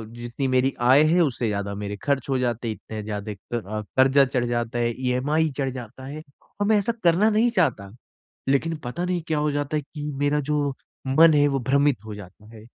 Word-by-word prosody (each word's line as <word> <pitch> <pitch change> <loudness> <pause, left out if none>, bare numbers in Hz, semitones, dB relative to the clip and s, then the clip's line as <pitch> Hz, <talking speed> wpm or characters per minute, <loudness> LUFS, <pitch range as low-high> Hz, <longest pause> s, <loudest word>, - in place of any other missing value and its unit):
जितनी 120 +3 -4
मेरी 130 +1 +2
आय 135 +4 +6
है, 160 +3 +3
उससे 125 -6 0
ज़्यादा 100 -1 -2
मेरे 105 0 -4
खर्च 140 -3 0
हो 135 - +1
जाते 120 -1 -1
हैं 110 - -3
इतने 110 0 -8
ज़्यादा 105 0 -5
क - - -16 0.2
अ, 105 -1 -4 0.2
कर्ज़ा 135 +1 +5
चढ़ 125 -2 -1
जाता 120 0 -2
है, 120 0 +1
ईएमआई 145 +6 +1
चढ़ 135 -2 0
जाता 130 +1 -9
है। 150 +3 -7 0.4
और - - +3
मैं 215 0 +4
ऐसा 205 +3 +1
करना 175 +5 +4
नहीं 220 +3 +3
चाहता। 135 - 0 0.6
लेकिन 160 +4 +1
पता 145 +9 -3
नहीं 180 -1 -1
क्या 160 -3 0
हो 150 0 +1
जाता 145 +1 -2
है 150 - -1
कि 145 +1 -9 0.2
मेरा 145 +1 +2
जो 145 -2 +1 0.3
मन 155 +4 +6
है 145 -1 +4
वो 140 -1 0
भ्रमित 140 0 +3
हो 110 -1 -7
जाता 105 +1 -12
है। 110 -1 -12
135 Hz, 215 wpm, -24 LUFS, 120-150 Hz, 0.6 s, आय